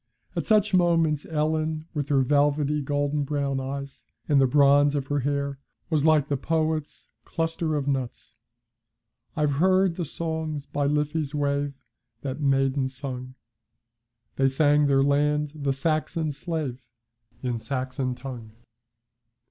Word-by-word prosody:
At - - -2
such 215 -2 +3
moments 165 -4 +2
Ellen, 155 0 -1
with 145 -3 -3
her 140 -2 +4
velvety 145 +2 +2
golden 145 +1 0
brown 140 -1 -1
eyes, 140 +1 -6 0.2
and 145 -3 +4
the 135 - +5
bronze 145 +1 +5
of 140 -2 -1
her 145 0 +1
hair, 140 0 -2 0.3
was 155 -3 +2
like 155 -2 +4
the 145 - 0
poet's 155 0 -2
'Cluster 165 -1 -2
of 145 -2 -2
Nuts.' 130 -3 -3 1.0
I've 150 -2 +1
heard 185 -1 +3
the 175 - -2
songs 160 -2 -3
by 145 0 -1
Liffey's 150 0 -1
wave 140 -1 -1 0.5
That 135 +1 -4
maidens 135 -1 +1
sung. 130 -1 -6 1.0
They 135 0 +3
sang 145 +2 +3
their 135 -1 +4
land, 150 +1 +1
the 140 -3 -1
Saxon's 155 +2 -1
slave, 150 -5 -4 0.6
In 120 -2 -1
Saxon 130 0 -3
tongue. 120 -5 -8
145 Hz, 130 wpm, -26 LUFS, 135-155 Hz, 1.0 s, the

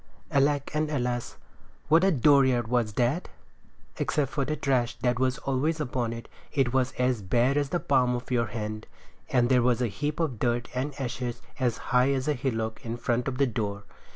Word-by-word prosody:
Alack 140 0 +2
and 155 0 0
alas, 125 -4 -2 0.5
what 160 +4 +5
a 195 - +5
dooryard 130 -4 +4
was 120 -3 0
that! 125 - 0 0.7
Except 145 -3 0
for 145 -1 -1
the 155 +3 -1
trash 130 -4 0
that 125 -1 +1
was 130 -1 +1
always 145 +4 -1
upon 125 -5 -1
it, 115 0 -7 0.2
it 130 -4 +1
was 130 -1 +1
as 125 -3 0
bare 120 +8 +2
as 145 -1 +1
the 175 - 0
palm 130 -4 +2
of 120 +1 -6
your 120 -2 +2
hand; 110 0 -5 0.4
and 125 -2 +3
there 125 0 +4
was 120 -1 +2
a 125 - +1
heap 150 +8 -3
of 140 -10 -1
dirt 120 -1 0
and 135 +3 -3
ashes 125 -2 -4 0.2
as 125 -4 +1 0.2
high 125 +2 +5
as 130 0 -2
a 150 - +3
hillock 115 -3 -3
in 115 -1 -4
front 120 +1 -1
of 130 -1 -2
the 140 - +4
door. 105 -5 -3
125 Hz, 195 wpm, -27 LUFS, 120-140 Hz, 0.7 s, what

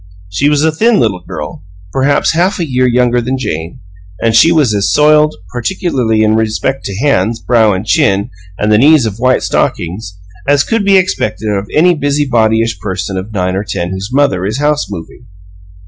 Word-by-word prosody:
She 135 +10 +1
was 150 0 +1
a 160 - +2
thin 220 +8 +2
little 105 -6 0
girl, - - -7 0.3
perhaps 135 +2 +1
half 175 +5 0
a 170 - -2
year 130 -1 +1
younger 125 0 +2
than 130 +3 -2
Jane; 85 -9 -5 0.4
and 115 -1 +1
she 160 +9 +6
was 150 -9 +2
as 100 -1 0
soiled, 150 +1 +3 0.2
particularly 120 -5 -1
in 110 0 +2
respect 110 +5 -1
to 100 -1 -5
hands, 115 -4 0
brow, 110 -5 +2
chin, 100 -2 +1 0.3
and 105 +1 0
the 105 - +4
knees 145 0 +5
of 110 0 -4
white 130 +1 +1
stockings, 95 +2 -2 0.3
as 145 0 +3
could 225 -2 -1
be 200 -1 +4
expected 110 - -1
of 100 -1 -2
any 175 +4 +4
busybodyish 115 - 0
person 95 0 -4
of 95 +3 -5
nine 90 -3 -2
or 100 - -2
ten 90 -3 -4
whose 95 +2 -5
mother 130 -10 +1
is 105 +5 -2
house 150 -4 0
moving. 100 +5 -9
115 Hz, 180 wpm, -13 LUFS, 100-145 Hz, 0.4 s, she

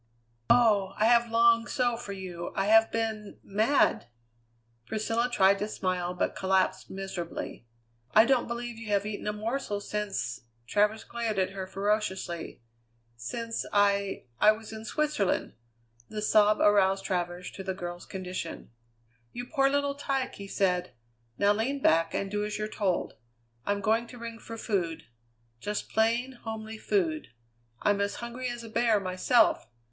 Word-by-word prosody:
"Oh! 205 -5 +4
I 215 - +3
have 235 0 +5
longed 230 0 +4
so 245 -3 +1
for 230 -3 -7
you! 180 -3 -6
I 195 - +1
have 225 +2 +5
been 220 -2 -3
mad!" 220 - +2 0.8
Priscilla 225 - 0
tried 195 -2 +4
to 210 - -1
smile, 180 -3 -2
but - - -1
collapsed 190 0 +1
miserably. 185 -9 -6 0.5
"I 220 - +8
don't 260 -1 +2
believe 235 -1 -5
you 230 - -8
have 205 -1 +1
eaten 210 0 -4
a - - +2
morsel 215 0 -2
since 205 - -3
" 115 +1 -40
Travers 210 - +2
glared 230 -3 -3
at 190 0 +1
her 190 -1 -5
ferociously. 190 - -2 0.5
"Since 230 - -4
I 200 -1 +2 0.2
I 215 - +7
was 220 0 -10
in 220 0 -7
Switzerland." 295 -6 0 0.6
The 210 -1 -4
sob 210 0 +4
aroused 195 -2 +4
Travers 175 -1 -2
to 190 - -8
the 190 -1 -3
girl's 175 -1 -6
condition. 185 -6 -6 0.6
"You 245 - -5
poor 275 0 +2
little 285 0 +1
tyke!" 275 -2 -2
he 200 - -8
said. 180 -6 0 0.4
"Now 205 +1 +4
lean 250 +7 -1
back 165 -8 +3
and 195 0 -2
do 205 0 -1
as 210 0 -3
you're 215 0 -2
told. 195 -4 -1 0.5
I'm 205 0 0
going 225 +3 +2
to 245 - -11
ring 230 -1 -7
for 230 0 -8
food. 175 -8 -2 0.6
Just 210 - -4
plain, 240 +3 +1
homely 220 -1 -6
food. 325 - 0 0.6
I'm 205 -1 +3
as 200 0 -1
hungry 240 +2 -5
as 240 -1 -6
a 225 - -9
bear 225 -1 +3
myself. 195 +5 +2
210 Hz, 155 wpm, -29 LUFS, 190-230 Hz, 0.8 s, I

